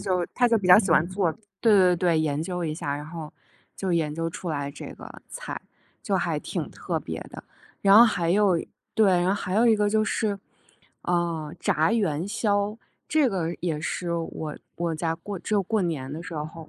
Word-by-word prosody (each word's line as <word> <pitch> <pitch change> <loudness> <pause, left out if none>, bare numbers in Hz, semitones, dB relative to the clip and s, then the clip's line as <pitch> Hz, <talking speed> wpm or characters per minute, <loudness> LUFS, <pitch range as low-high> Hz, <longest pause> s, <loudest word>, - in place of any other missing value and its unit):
就 185 -3 0
他 245 -1 +4
就 230 - +4
比 195 - -3
较 180 +2 +9
喜 205 - +1
欢 155 - +5
做， 185 -3 0 0.3
对 225 -3 +5
对 180 -2 +5
对， 170 -2 +2
研 150 -2 0
究 180 0 -3
一 155 -1 -2
下， 145 -3 -3
然 150 - -7
后 160 -2 -8 0.4
就 190 -2 -2
研 155 -3 0
究 165 0 -2
出 175 - -6
来 145 -2 -2
这 140 - -9
个 - - -12
菜。 - - -6 0.4
就 - - 0
还 - - 0
挺 - - -4
特 - - -3
别 - - -6
的。 - - -10 0.4
然 200 +1 +6
后 235 - +10
还 180 -7 +1
有， 195 -2 +4 0.4
对， 220 -1 +4
然 180 - +1
后 195 - +3
还 185 -2 -3
有 225 +3 +4
一 225 - +5
个 210 0 +2
就 215 +1 +2
是， 215 -1 0 0.7
呃， 170 -3 -1
炸 160 +8 +2
元 175 -7 0
宵。 205 0 0 0.3
这 305 -4 +3
个 175 -5 -2
也 165 -4 -2
是 170 +2 -3
我 165 -2 -4 0.2
我 170 -1 -1
家 160 +1 -1
过 190 +4 -7
只 215 - -3
有 200 - +3
过 215 +3 0
年 145 -6 -3
的 155 - -5
时 175 - -8
候 155 +1 -6
180 Hz, 225 characters per minute, -26 LUFS, 160-205 Hz, 0.7 s, 后